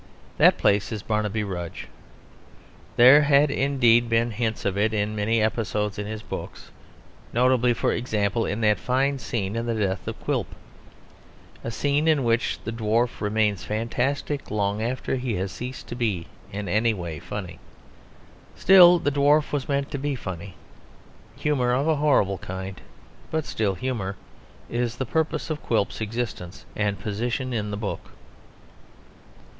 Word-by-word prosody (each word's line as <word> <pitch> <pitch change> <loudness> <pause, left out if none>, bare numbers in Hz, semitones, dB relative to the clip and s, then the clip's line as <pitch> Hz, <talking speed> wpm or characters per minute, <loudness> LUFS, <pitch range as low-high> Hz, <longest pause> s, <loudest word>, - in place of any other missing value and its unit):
That - - +6
place 100 +2 +2
is 110 -2 -4
Barnaby 105 0 -1
Rudge. 90 -4 -5 1.1
There 130 +5 +8
had 145 0 +4
indeed 120 -4 +3
been 115 +1 +2
hints 110 0 -2
of 100 -1 0
it 110 +2 +1
in 105 +1 -1
many 110 +2 +1
episodes 105 -2 -1
in 105 - -4
his 110 0 -6
books; - - -8 0.6
notably, 125 0 +3
for - - +1
example, 110 -2 0
in 105 +2 -2
that 105 -1 +3
fine 135 +2 0
scene 105 -5 -3
of 115 +1 -2
the 115 - 0
death 100 -3 -2
of - - -5
Quilp - - -1 1.2
a - - -3
scene 145 +6 0
in 155 -4 +3
which 115 0 +1
the 115 - -4
dwarf 115 +1 0
remains 105 -2 +1
fantastic 125 +6 -2
long 105 0 -1
after 130 +3 -2
he 125 -3 -2
has 95 +1 -2
ceased 125 +5 -7
to - - -5
be 105 -9 -1 0.3
in 100 0 -5
any 110 +5 +2
way 85 -5 -5
funny. 95 -1 -7 1.0
Still, 180 -2 +8
the 155 -4 0
dwarf 145 +2 +3
was 145 -2 -2
meant 140 0 -1
to 140 - -3
be 145 0 -1
funny. 95 -4 -7 0.8
Humour 130 -5 +1
of 135 +5 +1
a 160 -2 +2
horrible 115 - +2
kind, 95 +1 -7 0.5
but 160 -1 -1
still 100 -3 -1
humour, 100 -3 -3 0.5
is 120 -1 -2
the 130 - -3
purpose 160 +3 -1
of 150 - -3
Quilp's 110 -2 -1
existence 110 -5 -4
and 105 -1 0
position 120 +5 -2
in 105 -3 -2
the 105 - -4
book. 105 -1 -4
115 Hz, 155 wpm, -25 LUFS, 105-130 Hz, 1.2 s, There